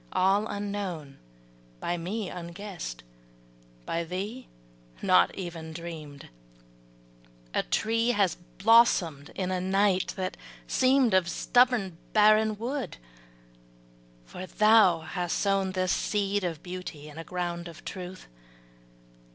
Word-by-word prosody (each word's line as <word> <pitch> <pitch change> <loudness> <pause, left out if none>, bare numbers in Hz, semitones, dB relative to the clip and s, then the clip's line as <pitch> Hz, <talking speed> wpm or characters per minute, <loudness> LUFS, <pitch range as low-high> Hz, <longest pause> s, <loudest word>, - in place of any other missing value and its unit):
All 195 +3 +3
unknown, 200 -9 -4 0.6
By 175 - -1
me 190 +5 -3
unguessed, 175 - -7 0.8
by 170 0 -1
thee 200 +9 -5 0.5
not 90 +7 +4
even 170 -4 -6
dreamed, 160 -4 -8 1.2
A - - +2
tree 225 - 0
has 200 -7 +2 0.2
blossomed 190 -9 +4
in 185 -1 -2
a 185 -1 -1
night 190 0 +2
that 185 0 -3 0.3
seemed 260 -3 +3
Of 185 -2 +3
stubborn, 230 -4 +2
barren 215 0 +5
wood. 255 +4 -4 1.3
For 185 - -8
thou 215 -6 +5
hast 175 +2 -2
sown 195 -2 +1
This 185 -1 0
seed 205 -1 0
of 165 -4 -3
beauty 180 -5 -7
in 150 +1 -10
a - - -5
ground 175 0 -4
of 165 -3 -12
truth. 185 0 -7
185 Hz, 110 wpm, -28 LUFS, 170-210 Hz, 1.3 s, barren